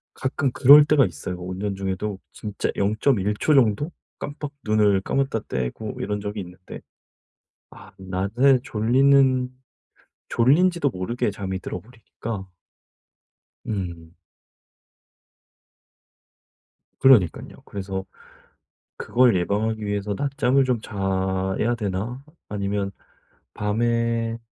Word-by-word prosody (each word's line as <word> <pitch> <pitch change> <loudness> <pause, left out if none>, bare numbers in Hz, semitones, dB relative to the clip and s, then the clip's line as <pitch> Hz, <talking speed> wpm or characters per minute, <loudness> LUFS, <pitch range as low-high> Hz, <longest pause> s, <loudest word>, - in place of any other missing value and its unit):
가끔 130 0 -1
그럴 145 +4 +8
때가 145 -3 +4
있어요. 85 +2 -5
운전 95 +3 -4
중에도 95 +1 -3
진짜 105 -2 -4
0.1 105 0 +1
초 155 - +3
정도 135 - +3 0.3
깜빡 145 0 -6
눈을 105 -2 +3
감았다 135 0 -1
떼고 65 -1 -4
이런 105 +1 -2
적이 105 +1 -4
있는데 90 0 -11 0.9
아 - - -14
낮에 100 +8 +2
졸리는 130 +3 +3 0.8
졸린지도 150 +5 +3
모르게 105 +3 -2
잠이 95 -2 -4
들어버리니까 115 -3 -7 1.2
음. 85 -5 -5 2.9
그러니깐요. 120 -11 +4
그래서 95 -1 -5 0.9
'그걸 125 -2 +3
예방하기 105 +4 -1
위해서 100 0 -2
낮잠을 140 -1 +2
좀 125 -4 0
자야 95 +2 -1
되나? 110 +4 -3 0.3
아니면 100 -1 -2 0.6
밤에' 115 +2 0
105 Hz, 215 characters per minute, -23 LUFS, 95-125 Hz, 2.9 s, 그럴